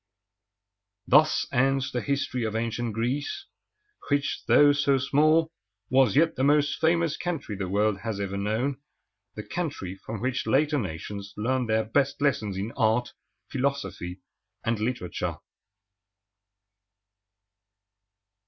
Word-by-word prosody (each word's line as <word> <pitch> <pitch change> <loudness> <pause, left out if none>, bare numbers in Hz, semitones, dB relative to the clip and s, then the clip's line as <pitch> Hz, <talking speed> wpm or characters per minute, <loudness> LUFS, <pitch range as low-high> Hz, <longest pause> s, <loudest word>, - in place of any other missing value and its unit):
Thus - - +4
ends 135 +1 +1
the 125 - -2
history 140 -3 -1
of 110 -1 -2
ancient 115 +1 -2
Greece, 135 - -2 0.6
which, 145 0 0
though 145 0 +7
so 140 -1 +2
small, 155 +4 +3 0.4
was 130 -5 +4
yet 165 +2 +4
the 130 - -1
most 145 0 +3
famous 165 -1 +2
country 165 -11 -4
the 95 -2 -4
world 105 +1 +1
has 110 -2 -4
ever 100 -1 -3
known, 115 +7 -1 0.5
the 105 - -6
country 145 - -4
from 105 +2 -7
which 130 +2 -2
later 150 +1 +2
nations 100 +1 -6
learned 125 +2 0
their 110 0 +2
best 140 +5 0
lessons 110 -9 0
in 100 +4 -3
art, 115 0 +1 0.4
philosophy, 130 -9 -3 0.4
and 115 -1 0
literature. 110 -5 -2
125 Hz, 120 wpm, -27 LUFS, 110-145 Hz, 0.6 s, though